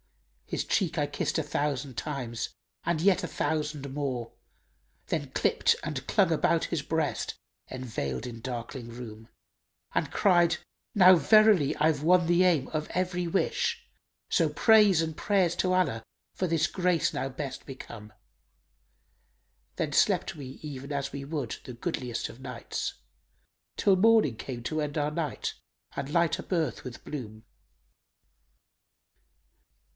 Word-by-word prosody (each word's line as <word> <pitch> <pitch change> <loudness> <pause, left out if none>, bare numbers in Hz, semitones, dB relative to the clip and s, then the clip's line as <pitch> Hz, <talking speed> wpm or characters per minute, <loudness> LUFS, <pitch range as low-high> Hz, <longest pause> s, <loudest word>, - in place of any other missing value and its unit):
His - - -2
cheek 180 -6 0
I 145 - +2
kissed 145 - -2
a 160 - +1
thousand 145 -3 -2
times, 120 -5 -3 0.3
and 170 -2 0
yet 185 +2 +3
a - - -1
thousand 150 -2 -2
more; 130 -5 -3 0.3
* - - -42
Then - - -1
clipt - - +2
and - - -4
clung - - +3
about - - +2
his - - -2
breast - - -1 0.3
enveiled 110 - -4
in 115 -2 -7
darkling 120 0 -5
room. 115 -1 -9 0.6
And - - 0
cried, 175 -4 +4 0.4
'Now 185 -2 +8
verily 190 -1 +5
I've 150 -1 +2
won 175 +1 +5
the 175 +2 +4
aim 165 -8 +3
of 155 -1 -2
every 180 -1 -1
wish 470 - 0 0.2
* - - -57
So - - +3
praise 210 -6 +5
and 160 -1 -4
prayers 190 -3 +2
to 185 - +1
Allah 155 -12 +1 0.3
for 185 - -1
this 160 -2 +2
grace 180 -1 +1
now 135 +1 -2
best 135 +1 -6
become.' 115 -5 -9 1.7
Then - - -1
slept - - +2
we 140 -4 -8 0.2
even 140 -1 -7
as 140 -1 -2
we 140 - -5
would 140 -5 -4
the 125 - -8
goodliest 125 -3 -3
of 120 - -12
nights 125 -3 -4 0.4
* - - -47
Till 195 - +4
morning 215 - +4
came 120 +1 -6
to 155 +5 -1
end 150 0 -3
our 150 0 0
night 150 -2 -3 0.4
and 140 0 -4
light 170 +2 +2
up - - -10
earth 160 -9 0
with 125 -2 -8
bloom." 110 -7 -7
150 Hz, 145 wpm, -28 LUFS, 130-175 Hz, 1.7 s, Now